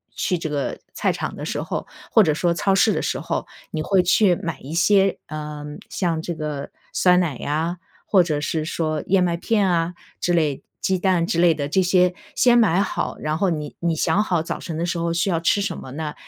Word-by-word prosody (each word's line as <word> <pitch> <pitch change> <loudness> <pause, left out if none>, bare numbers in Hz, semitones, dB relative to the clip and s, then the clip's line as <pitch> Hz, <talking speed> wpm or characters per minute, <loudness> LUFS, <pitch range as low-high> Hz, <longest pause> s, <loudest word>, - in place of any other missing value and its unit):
去 180 - 0
这 160 -1 -4
个 145 -2 -2
菜 - - +1
场 - - -4
的 - - -6
时 - - -2
候， - - -4 0.2
或 220 - +6
者 155 -5 +2
说 170 +3 +1
超 195 +4 +1
市 215 +3 +4
的 - - -1
时 - - -1
候， - - -3 0.3
你 155 - -2
会 190 +4 +3
去 180 +1 +4
买 165 -4 -5
一 140 +4 -8
些， 195 +3 +3
呃 150 -1 -6 0.2
像 170 -4 -1
这 170 - -4
个 150 -3 -5 0.2
酸 180 -1 +4
奶 160 -8 -1
呀， 160 +4 -2 0.3
或 190 -3 +4
者 155 -4 -1
是， 155 +1 -1
说 155 -2 -2
燕 190 -1 +4
麦 170 -1 0
片 205 +2 +1
啊 170 0 +1 0.3
之 175 - 0
类 155 -5 +1 0.2
鸡 190 -1 +1
蛋 180 -2 +2
之 170 - -1
类 175 -2 +6
的 145 -2 -2
这 190 +6 +2
些 180 0 +3 0.2
先 240 -1 +5
买 195 -6 +3
好， - - -2
然 155 +1 -1
后 195 - +2
你 150 -3 -4
你 170 -1 0
想 160 +6 +2
好 175 -6 0
早 - - -4
晨 165 -2 -5
的 170 - -1
时 175 0 -2
候 170 0 0
需 170 +3 +1
要 165 - +1
吃 170 +5 +2
什 200 - -2
么 130 - -9
呢？ 150 0 -4
170 Hz, 245 characters per minute, -22 LUFS, 155-185 Hz, 0.3 s, 或